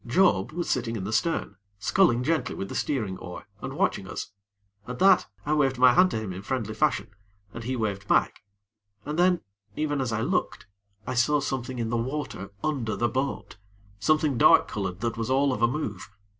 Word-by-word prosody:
Job 120 - +3
was 175 +2 -3
sitting 120 -2 -1
in 100 - -4
the 105 +3 -3
stern, 165 +9 0 0.2
sculling 120 - +3
gently 155 -3 0
with 95 - -5
the - - -6
steering 110 -10 -2
oar 90 0 -8 0.2
and - - -5
watching - - 0
us. - - -6 0.6
At 125 0 -5
that, 190 +2 +5 0.2
I 150 - +1
waved 135 -4 +2
my 125 0 +6
hand 185 +1 +5
to 110 - -2
him 105 -4 -5
in 95 - -7
friendly 110 -1 -3
fashion, 110 +1 +1 0.4
and 115 -1 -7
he 130 +2 -1
waved 105 -4 -3
back, - - +2 0.6
and 150 +3 -3
then, 180 0 +4 0.3
even 145 -2 -1
as 125 -3 -1
I 110 0 -1
looked, - - -1 0.4
I - - -3
saw 135 +5 +3
something 130 -2 -3
in 115 -1 -2
the 120 - +1
water 130 -5 -4
under 130 -8 -1
the 120 - +1
boat 130 -1 -3 0.4
something 155 0 +2
dark - - +6
colored 95 -2 -4
that 115 -1 -2
was 115 0 -2
all 135 +1 +3
of - - -4
a 120 - +5
move. 115 - -4
125 Hz, 200 wpm, -26 LUFS, 110-150 Hz, 0.6 s, my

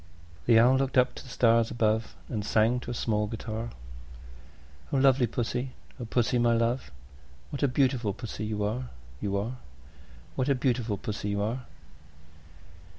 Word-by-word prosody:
The 115 -2 +7
Owl 125 +3 +6
looked 135 0 0
up 125 0 +4
to - - -9
the 130 - -12
stars 115 -2 +3
above, 110 -1 0
And 110 -4 -3
sang 110 +4 +3
to 120 - -8
a - - -2
small 105 -2 0
guitar, 115 +1 -4 1.2
"O 140 - +2
lovely 135 -2 +4
Pussy, 120 +3 -2 0.3
O 120 - -4
Pussy, 120 +1 +1
my 120 -1 +4
love, 115 - 0 0.6
What 140 - -4
a 140 - +4
beautiful 125 -4 +1
Pussy 110 +1 -6
you 105 -1 -2
are, 120 +5 -2 0.3
You 100 -1 0
are, 100 - 0
You 110 - -4
are! 130 - -7 0.8
What 130 +2 0
a 140 - +4
beautiful 120 -5 0
Pussy 105 +1 -4
you 100 0 0
are!" 120 +4 -3
115 Hz, 170 wpm, -28 LUFS, 110-125 Hz, 1.2 s, The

